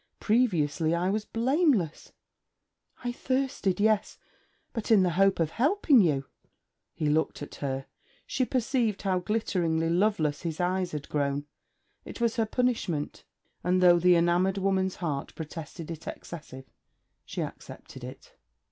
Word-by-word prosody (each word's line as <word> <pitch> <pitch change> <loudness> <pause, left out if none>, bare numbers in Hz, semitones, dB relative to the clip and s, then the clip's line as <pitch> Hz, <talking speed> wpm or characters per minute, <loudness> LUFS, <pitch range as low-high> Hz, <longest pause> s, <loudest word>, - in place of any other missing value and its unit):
Previously 170 - +2
I 180 +2 +1
was 215 +1 -1
blameless. 240 - +1 0.9
I 245 - -1
thirsted, 255 -7 -1
yes; 215 -1 +2 0.6
but 225 -4 -4
in 215 -4 +6
the 180 - +2
hope 195 +2 +3
of 165 -2 +1
helping 290 - +4
you.' 145 -7 +1 0.7
He 155 -2 -1
looked 150 0 0
at - - -9
her. 135 -1 -2 0.4
She 260 - 0
perceived 245 -4 0
how 190 -2 +1
glitteringly 175 -5 0
loveless 170 -5 +1
his 165 -3 -4
eyes 180 0 0
had 150 -1 -5
grown. 145 -1 -1 0.6
It - - -9
was 235 0 +1
her 225 -1 +2
punishment; 220 - -1 0.4
and 180 +1 +2
though 175 -1 +6
the 180 +1 +5
enamoured 175 +3 +2
woman's 190 -1 +1
heart 150 -6 -4
protested 160 +1 -7
it 165 -1 -8
excessive, 150 -6 -8 0.6
she - - -4
accepted - - -10
it. - - -10
180 Hz, 140 wpm, -28 LUFS, 160-220 Hz, 0.9 s, in